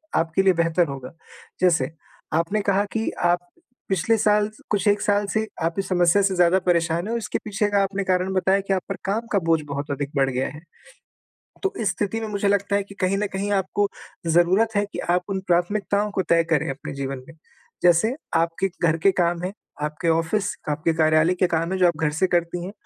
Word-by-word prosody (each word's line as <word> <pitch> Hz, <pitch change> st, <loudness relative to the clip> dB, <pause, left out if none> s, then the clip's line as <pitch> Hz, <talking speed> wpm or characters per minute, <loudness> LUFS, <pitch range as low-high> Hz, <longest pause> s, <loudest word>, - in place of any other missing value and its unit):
आपके 165 Hz, +3 st, +2 dB
लिए 190 Hz, -1 st, +5 dB
बेहतर 170 Hz, 0 st, +2 dB
होगा। 135 Hz, -2 st, -7 dB, 0.5 s
जैसे 180 Hz, -3 st, +3 dB, 0.4 s
आपने 170 Hz, +6 st, +1 dB
कहा 200 Hz, +1 st, +3 dB
कि 225 Hz, 0 st, -1 dB
आप 175 Hz, 0 st, +3 dB, 0.5 s
पिछले 195 Hz, +4 st, +2 dB
साल 210 Hz, 0 st, +2 dB, 0.2 s
कुछ 205 Hz, -1 st, 0 dB
1 205 Hz, 0 st, +3 dB
साल 205 Hz, -1 st, +2 dB
से 220 Hz, 0 st, +1 dB, 0.2 s
आप 165 Hz, 0 st, 0 dB
इस 195 Hz, -, -2 dB
समस्या 175 Hz, +1 st, +4 dB
से 195 Hz, -1 st, +1 dB
ज़्यादा 180 Hz, +1 st, +4 dB
परेशान 170 Hz, 0 st, +1 dB
हो, 230 Hz, -, -2 dB
इसके 230 Hz, -, -3 dB
पीछे 210 Hz, 0 st, -1 dB
का 200 Hz, -1 st, +3 dB
आपने 195 Hz, 0 st, -2 dB
कारण 185 Hz, 0 st, 0 dB
बताया 190 Hz, +1 st, +2 dB
कि 195 Hz, -, +2 dB
आप 190 Hz, -, 0 dB
पर 195 Hz, -, -2 dB
काम 220 Hz, +4 st, -1 dB
का 200 Hz, -, +3 dB
बोझ 165 Hz, -2 st, +1 dB
बहुत 140 Hz, 0 st, -4 dB
अधिक 140 Hz, 0 st, -3 dB
बढ़ 135 Hz, -1 st, +2 dB
गया 130 Hz, 0 st, -1 dB
है। 150 Hz, +2 st, -11 dB, 1.0 s
तो 390 Hz, -, 0 dB
इस 215 Hz, -3 st, +1 dB
स्थिति 205 Hz, +2 st, -2 dB
में 220 Hz, -, -3 dB
मुझे 205 Hz, -1 st, -1 dB
लगता 200 Hz, 0 st, +1 dB
है 200 Hz, -, +1 dB
कि 200 Hz, 0 st, -14 dB
कहीं 185 Hz, +1 st, +2 dB
न 210 Hz, +1 st, 0 dB
कहीं 200 Hz, +2 st, -2 dB
आपको 200 Hz, +1 st, +1 dB, 0.4 s
ज़रूरत 185 Hz, +7 st, +3 dB
है, 205 Hz, 0 st, +2 dB
कि 205 Hz, -, -8 dB
आप 175 Hz, +1 st, +1 dB
उन 195 Hz, -1 st, -1 dB
प्राथमिकताओं 200 Hz, +4 st, +1 dB
को 195 Hz, -, 0 dB
तय 165 Hz, 0 st, +4 dB
करें 155 Hz, -1 st, +2 dB
अपने 135 Hz, +1 st, -6 dB
जीवन 135 Hz, -1 st, -5 dB
में। 160 Hz, -, -12 dB, 0.5 s
जैसे 180 Hz, +7 st, +4 dB, 0.2 s
आपके 165 Hz, +3 st, +1 dB
घर 165 Hz, -1 st, +3 dB
के 195 Hz, -, +7 dB
काम 175 Hz, -2 st, 0 dB
हैं, 185 Hz, +2 st, -3 dB, 0.3 s
आपके 150 Hz, +3 st, -1 dB
ऑफ़िस, 165 Hz, +5 st, 0 dB
आपके 150 Hz, +2 st, 0 dB
कार्यालय 155 Hz, +1 st, +3 dB
के 180 Hz, 0 st, +2 dB
काम 165 Hz, +1 st, -1 dB
हैं 190 Hz, -, 0 dB
जो 180 Hz, -, +5 dB
आप 170 Hz, -3 st, 0 dB
घर 160 Hz, -2 st, 0 dB
से 190 Hz, -, +5 dB
करती 175 Hz, 0 st, -1 dB
हैं। 190 Hz, -, -6 dB
180 Hz, 215 wpm, -23 LUFS, 165-200 Hz, 1.0 s, के